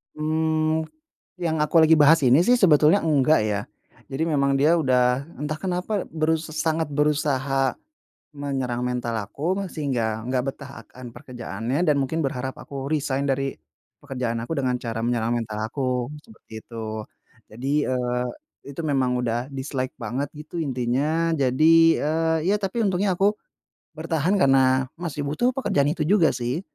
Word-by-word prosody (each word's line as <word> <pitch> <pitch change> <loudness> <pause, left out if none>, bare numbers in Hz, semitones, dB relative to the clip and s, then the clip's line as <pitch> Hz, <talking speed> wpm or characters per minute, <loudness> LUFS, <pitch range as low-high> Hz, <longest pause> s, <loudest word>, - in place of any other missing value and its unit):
Mmm, 155 +1 0
mu - - -16 0.5
yang 160 -3 0
aku 160 +2 +3
lagi 160 0 +7
bahas 150 +2 +6
ini 130 +7 +6
sih 245 +6 +4
sebetulnya 160 -1 +5
enggak 150 -1 +3
ya. 105 -2 -1 0.5
Jadi 135 +4 -1
memang 140 -3 +1
dia 150 +5 +4
udah 130 -4 +2 0.2
entah 150 +1 -3
kenapa 185 +2 -2
berus 160 0 -1
sangat 160 0 -1
berusaha 140 -2 0 0.6
menyerang 135 -4 -3
mental 120 -2 -2
aku 170 - -2
nge 195 - -4
sehingga 115 -7 -1
enggak 125 +1 0
betah 140 -1 -11 0.2
akan 125 -1 -11
pekerjaannya 125 0 -4
dan 150 - +4
mungkin 135 +5 -1
berharap 130 -1 -3
aku 135 -1 -6
resign 140 -2 -1
dari 135 0 -1 0.5
pekerjaan 125 -4 -3
aku 120 - -5
dengan 130 -2 0
cara 115 -1 -4
menyerang 115 -1 0
mental 110 -2 -5
aku 125 0 -2
seperti 220 - -20
itu. 110 -2 -6 0.5
Jadi, 135 +6 -1
eee, 125 -1 -1 0.4
itu 140 +3 -7
memang 130 -4 +1
udah 120 +2 -2
dislike 130 -1 -4
banget 135 +3 -3
gitu 155 +3 -6
intinya, 145 +4 0
jadi 140 +2 +3 0.3
eee, 160 +2 +1
ya - - +3
tapi 195 +5 -1
untungnya 190 0 +1
aku 200 +2 +3 0.6
bertahan 160 +3 -1
karena, 130 -2 +4
masih 165 -4 -4
butuh 240 - +1
pekerjaan 145 - +1
itu 165 - -4
juga 180 -4 +4
sih. 125 +6 -2
140 Hz, 150 wpm, -24 LUFS, 125-160 Hz, 0.6 s, lagi